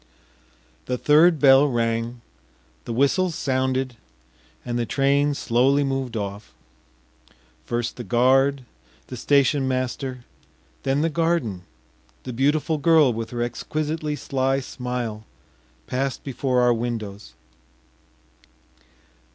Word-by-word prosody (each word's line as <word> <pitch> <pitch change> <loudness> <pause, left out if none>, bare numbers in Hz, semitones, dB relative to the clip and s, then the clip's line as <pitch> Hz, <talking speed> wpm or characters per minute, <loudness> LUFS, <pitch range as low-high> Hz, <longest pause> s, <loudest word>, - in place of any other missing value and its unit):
The 125 - -1
third 155 +5 +5
bell 135 0 +6
rang, 115 -1 -1 0.6
the - - -5
whistles 155 +8 +1
sounded, 130 -2 -1 0.7
and 120 0 -2
the 120 - 0
train 140 +4 +2
slowly 135 +4 +2
moved 135 -3 -2
off. 100 0 -6 1.1
First 120 0 -3
the 120 - -5
guard, 130 +5 +2 0.4
the 125 - -6
station 140 +2 +2
master, 130 0 -3 0.6
then 135 +2 0
the 165 - +1
garden, 150 - -1 0.6
the 125 - -6
beautiful 150 +5 +1
girl 155 -4 +4
with 115 0 -5
her 120 -1 -2
exquisitely 150 +4 -3
sly 135 -1 -1
smile, 125 -4 -5 0.6
passed 135 +1 -3
before 130 -2 0
our 120 0 +4
windows.... 110 -4 -5
130 Hz, 105 wpm, -23 LUFS, 120-140 Hz, 1.1 s, bell